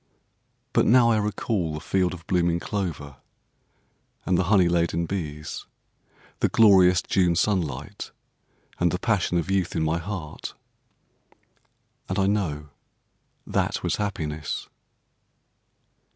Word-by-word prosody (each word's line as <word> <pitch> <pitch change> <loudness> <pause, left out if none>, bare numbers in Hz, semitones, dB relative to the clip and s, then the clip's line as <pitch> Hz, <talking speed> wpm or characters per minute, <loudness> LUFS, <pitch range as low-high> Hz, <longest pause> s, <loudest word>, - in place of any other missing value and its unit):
But - - +3
now 120 0 +6
I 110 - +3
recall 105 -5 -1
the - - -4
field 90 +2 0
of 85 -1 -14
blooming 85 -2 +1
clover, 85 -9 -4 1.1
and 90 - +2
the 90 - +2
honey 95 -2 +4
laden 85 -1 +1
bees, 75 -5 -5 0.7
the - - +2
glorious 95 -5 +5
June 90 -3 +2
sunlight, 80 -8 -1 0.7
and 85 - +3
the 90 - -1
passion 100 -5 0
of 85 +3 -1
youth 95 -3 0
in 80 - +1
my 80 +2 0
heart; 85 -4 -6 1.5
and 95 - -2
I 95 - +3
know 80 -8 -1 0.8
that - - -1
was - - 0
happiness. 80 -8 -3
90 Hz, 120 wpm, -25 LUFS, 80-100 Hz, 1.5 s, now